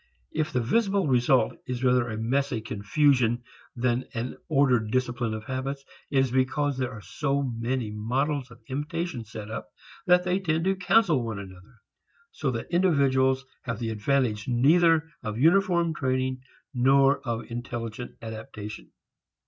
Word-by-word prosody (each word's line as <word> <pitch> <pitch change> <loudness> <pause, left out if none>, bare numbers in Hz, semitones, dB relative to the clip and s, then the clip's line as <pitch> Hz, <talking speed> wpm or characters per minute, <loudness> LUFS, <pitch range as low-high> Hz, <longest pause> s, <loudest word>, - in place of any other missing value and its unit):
If 155 0 -1
the 125 - +1
visible 200 - +2
result 130 -1 +3
is 125 0 -3
rather 125 -2 +3
a 110 - -4
messy 130 +2 0
confusion 120 +3 +1 0.3
than 120 +1 0
an 120 +2 -3
ordered 130 -7 +3
discipline 120 -2 -1
of 110 - -6
habits, 135 +3 -4 0.2
it 140 - 0
is 135 -2 +3
because 130 +2 +1
there 130 -1 -1
are 110 -3 -9
so 140 - -1
many 120 -2 -2
models 130 +6 -1
of 115 0 -16
imitation 150 -2 -3
set 110 0 -8
up 90 - -6 0.4
that 180 0 +5
they 180 +1 +1
tend 165 -3 0
to 190 0 +2
cancel 180 - +3
one 115 -3 -4
another, 95 +4 -12 0.5
so 150 - -2
that 115 -3 -4
individuals 135 -7 +3 0.2
have 115 -3 -4
the 115 -1 -3
advantage 110 -1 0
neither 160 +6 +4
of 110 -3 -4
uniform 170 - +3
training 130 -2 -1 0.3
nor 135 +2 +4
of 115 -3 -3
intelligent 120 0 -5
adaptation. 110 -2 -8
130 Hz, 150 wpm, -27 LUFS, 115-145 Hz, 0.5 s, that